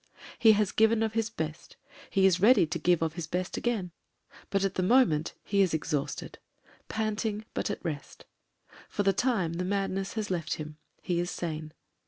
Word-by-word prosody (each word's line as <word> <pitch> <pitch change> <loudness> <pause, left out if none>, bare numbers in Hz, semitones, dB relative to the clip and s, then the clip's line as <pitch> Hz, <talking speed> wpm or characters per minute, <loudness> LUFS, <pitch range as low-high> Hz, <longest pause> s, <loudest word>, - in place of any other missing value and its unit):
He 225 -2 +7
has 210 -2 +1
given 220 0 +3
of 220 -1 -1
his 225 -1 0
best; 160 -6 -6 0.3
he 195 -1 +3
is 185 -2 +4
ready 225 -3 +6
to 165 +2 -3
give 170 +1 +3
of 160 -1 -1
his 165 -1 -5
best 180 +2 -2
again; 215 -7 -1 0.6
but 195 -1 +1
at 195 -1 0
the 185 - -1
moment 185 -7 +3
he 200 -1 +2
is 180 -4 +2
exhausted; 150 -2 -3 0.5
panting, 215 0 -2
but - - -2
at 205 - -5
rest 150 -4 -6 0.6
For 205 - -1
the 195 0 +3
time 195 -7 +1
the 175 +2 -2
madness 195 0 -1
has 215 -3 -3
left 170 -3 -1
him; 150 -1 -8 0.3
he 175 -1 0
is 175 0 -1
sane. 155 -3 -4
190 Hz, 185 wpm, -29 LUFS, 165-215 Hz, 0.6 s, He